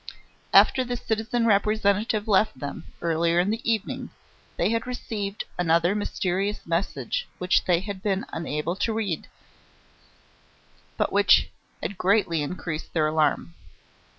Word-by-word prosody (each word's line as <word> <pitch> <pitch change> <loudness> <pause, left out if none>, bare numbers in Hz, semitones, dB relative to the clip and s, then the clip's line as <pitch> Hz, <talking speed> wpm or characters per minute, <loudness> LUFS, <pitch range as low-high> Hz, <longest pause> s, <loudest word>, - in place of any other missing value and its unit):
After 260 - +6
the 245 0 -3
citizen 225 +1 -1
Representative 210 0 +2
left 210 -5 +3
them, 145 +4 -6 0.2
earlier 170 +1 +2
in 185 +4 +2
the 225 +1 -2
evening, 215 -2 -2 0.5
they - - +2
had 230 +1 -1
received 210 -5 -4 0.2
another 170 +1 +3
mysterious 200 0 -2
message 195 - -2
which 180 +1 +2
they 175 -1 +3
had 200 -1 -6
been 195 -1 -1
unable 165 +1 -2
to 225 - 0
read, 205 -8 -2 1.7
but - - 0
which - - +5 0.3
had 190 +3 -4
greatly 185 -5 +2
increased 155 +1 -5
their 160 -2 +2
alarm. 155 +1 +1
195 Hz, 125 wpm, -25 LUFS, 170-215 Hz, 1.7 s, After